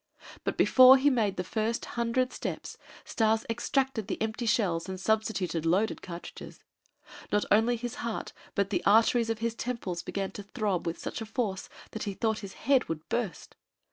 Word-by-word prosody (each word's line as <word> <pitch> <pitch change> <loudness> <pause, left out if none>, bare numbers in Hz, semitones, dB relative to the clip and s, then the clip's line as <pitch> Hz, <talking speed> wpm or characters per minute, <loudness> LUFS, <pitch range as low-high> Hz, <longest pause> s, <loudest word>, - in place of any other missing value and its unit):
But - - -2
before 260 +1 +8
he 285 +2 +3
made 215 -6 +1
the 180 - -1
first 220 +5 -2
hundred 240 +2 0
steps, - - -5 0.3
Stas 220 +1 +1
extracted 235 0 -1
the - - -3
empty 220 +2 -2
shells 185 -6 +1
and 190 0 -5
substituted 195 -5 0
loaded 190 +7 +1
cartridges. 175 -1 -9 0.7
Not 205 0 +2
only 225 +3 +4
his 240 0 -5
heart 235 -2 -4 0.2
but 200 -1 0
the 180 -3 0
arteries 225 +2 +4
in 225 - 0
his 230 +1 -1
temples 230 -7 -4
began 195 -1 -3
to - - -7
throb 200 -4 -2
with 165 - -2
such - - -5
a - - -3
force 210 -5 -3 0.2
that 220 - -5
he 200 -2 -3
thought 220 0 0
that 200 - -6
his 190 - -12
head 270 -1 +3
would 160 0 -4
burst. 230 -8 -3
220 Hz, 180 wpm, -29 LUFS, 195-235 Hz, 0.7 s, before